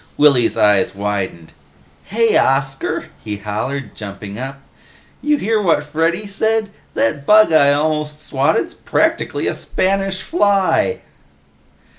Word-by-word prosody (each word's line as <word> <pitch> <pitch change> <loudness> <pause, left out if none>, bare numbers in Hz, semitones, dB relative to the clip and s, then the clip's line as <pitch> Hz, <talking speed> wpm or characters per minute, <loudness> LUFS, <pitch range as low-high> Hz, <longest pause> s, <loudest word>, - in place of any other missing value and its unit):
Willy's 140 -6 +4
eyes 105 -2 +3
widened. 100 -5 -4 0.5
"Hey, 230 +2 +1
Oscar," 135 0 0
he 105 -1 -4
hollered, 110 +7 -4
jumping 100 0 -8
up. 135 +1 -6 0.6
"You 300 0 +2
hear 220 -2 0
what 165 -6 +2
Freddy 165 +6 -1
said? 220 +1 0 0.2
That 140 +5 0
bug 215 -5 +6
I 145 -2 +5
almost 150 0 -1
swatted's 140 +3 0
practically - - -1
a - - 0
Spanish 195 0 -1
Fly!" 205 - +1
150 Hz, 115 wpm, -18 LUFS, -, 0.6 s, bug